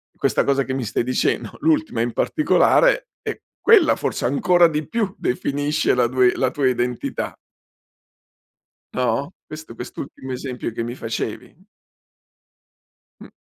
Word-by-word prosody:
questa - - +1
cosa 140 0 +2
che 130 - -4
mi 130 -2 -2
stai 110 +2 -1
dicendo, 125 +1 0
l'ultima 315 - +1
in 120 0 0
particolare, - - +3
e - - -5 0.2
quella 415 -8 +6
forse - - -2
ancora 175 +7 +4
di 150 -2 -3
più 215 -5 -1
definisce 145 +4 0
la 125 -1 +3
due 125 0 +3
la 130 - +1
tua 135 0 0
identità 125 -1 -2 1.6
No, 125 +5 0
questo 155 -5 -9
quest'ultimo 130 +2 -7
esempio 125 -2 -4
che 115 - -3
mi 120 +2 -5
facevi. 115 - -5 1.6
Mh. - - -12
135 Hz, 130 wpm, -21 LUFS, 125-170 Hz, 1.6 s, quella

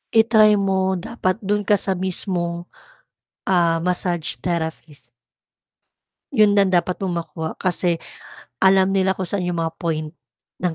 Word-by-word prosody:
I-try 220 -2 +6
mo, 190 -1 +1
dapat 185 -1 -2
do'n 205 +1 -1
ka 205 - +5
sa 195 -1 0
mismong, 175 -2 -2 0.8
ah, 170 -3 +3
massage 175 -1 -1
therapist. 160 -6 -4 1.2
'Yon 210 -2 +5
ang 195 - +4
dapat 180 0 +1
mong 185 -3 -2
makuha, 160 0 -6
kasi, 180 -1 0 0.6
alam 190 0 +4
nila 190 -1 +2
kung 190 - -4
saan 190 -3 -2
yung 175 -1 -1
mga 165 0 -3
point, 155 -3 -2 0.5
ng 175 -2 -1
185 Hz, 135 wpm, -21 LUFS, 170-195 Hz, 1.2 s, I-try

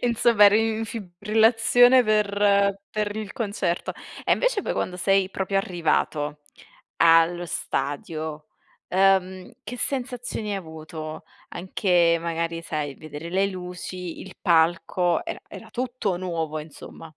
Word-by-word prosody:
Insomma, 235 -3 +4
eri 220 +2 +4
in 225 - -2
fibrillazione 225 +5 +3
per 200 -2 +2
per 210 -1 -2
il 215 -2 -5
concerto. 200 -5 -2 0.3
E - - +3
invece - - +1
poi - - -2
quando 180 - -3
sei 195 +1 +2
proprio 195 0 -1
arrivato 155 -5 -1 0.6
allo 165 +1 +4
stadio, 155 +1 -4 0.4
ehm, 190 -1 +2
che 250 - -7
sensazioni 245 -5 -3
hai - - -1
avuto? 160 -2 -8 0.3
Anche 175 -2 +2
magari 165 0 -3
sai 150 -4 -4
vedere 155 +1 -8
le 190 +3 +2
luci, 180 -1 -7
il 190 - -10
palco, 170 +1 +2
era - - -5
era - - -11
tutto 245 -7 -2
nuovo 165 -4 -3
insomma. 150 +1 -11
185 Hz, 120 wpm, -24 LUFS, 165-210 Hz, 0.6 s, Insomma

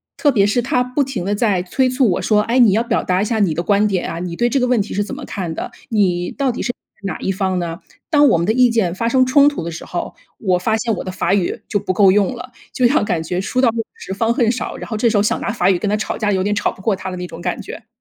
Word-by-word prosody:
特 290 - +2
别 205 -6 +3
是 225 +4 +1
他 250 +1 +1
不 250 +3 0
停 260 -9 -4
的 205 +1 0
在 205 -4 +1
催 255 +8 +1
促 255 -2 +2
我 175 - -1
说， 210 -1 +3
哎， 235 +4 +1
你 235 -5 +6
要 215 +4 +2
表 235 - 0
达 185 +1 +1
一 - - +1
下 220 0 -1
你 190 -6 +2
的 165 - -2
观 200 +4 +2
点 190 -3 -1
啊， 165 - -5
你 175 -1 -4
对 240 +6 +1
这 275 - +1
个 250 - +1
问 245 -3 +2
题 200 - -5
是 205 - 0
怎 210 - -7
么 285 0 -7
看 180 -9 -4
的？ - - -5 0.2
你 180 -5 +1
到 275 -2 -1
底 240 - -5
是 - - -3
站 - - -31 0.3
在 195 - -2
哪 - - -8
一 - - -3
方 190 -1 -1
呢？ 170 -1 -5 0.3
当 295 -2 +5
我 - - +3
们 170 +2 -1
的 220 - +3
意 250 0 +4
见 210 -7 0
发 230 +4 -1
生 255 +1 +4
冲 280 +3 +5
突 285 - -5
的 170 - -4
时 165 - -7
候， 175 - -5 0.2
我 185 -4 +1
发 220 +5 0
现 225 0 -1
我 - - -5
的 185 - -5
法 185 +1 0
语 195 -3 0
就 - - 0
不 185 - -2
够 195 0 +5
用 200 +4 +3
了， 245 +1 -9 0.2
就 250 - +3
像 285 +6 +2
感 180 -6 -1
觉 180 +3 -2
书 250 +6 -2
到 255 -2 +4
用 225 0 -2
时 190 - -7
方 225 +4 +1
恨 235 -2 +2
少， 240 - -3
然 - - -8
后 225 - -3
这 230 +2 +2
时 215 - +1
候 - - +4
想 210 - 0
拿 - - -2
法 190 -4 +1
语 190 - +3
跟 205 +3 -2
他 210 - +1
吵 215 - -3
架， 210 -2 0
有 190 -2 +1
点 205 +2 0
吵 205 - 0
不 - - -14
过 205 +1 +1
他 185 - -6
的 180 - -6
那 180 0 -5
种 170 - -10
感 180 0 -3
觉。 220 - -10
210 Hz, 350 characters per minute, -19 LUFS, 185-240 Hz, 0.3 s, 你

